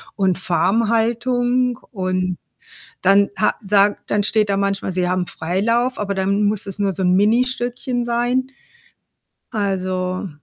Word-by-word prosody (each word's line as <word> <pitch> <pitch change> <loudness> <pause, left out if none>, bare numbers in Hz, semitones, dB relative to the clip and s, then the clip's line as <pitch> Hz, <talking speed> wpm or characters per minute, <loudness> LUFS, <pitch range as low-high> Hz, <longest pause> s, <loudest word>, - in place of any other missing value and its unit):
und 190 -3 +1
Farmhaltung 235 +6 +1
und 185 -3 -2 0.6
dann 200 +1 +4
ha 210 - +2
sagt 205 0 +1
dann 205 0 +2
steht 215 -1 +1
da 195 - +1
manchmal, 200 -1 -1
sie 180 0 0
haben 180 -1 0
Freilauf, 230 +9 -1
aber 200 -1 -2
dann 195 +2 0
muss 205 -1 0
es 195 +1 -7
nur 200 -1 +1
so 190 - -4
'n 180 0 +3
Ministückchen 245 +3 0
sein. 245 +2 0 1.0
Also 185 -2 -2
205 Hz, 130 wpm, -20 LUFS, 190-235 Hz, 1.0 s, dann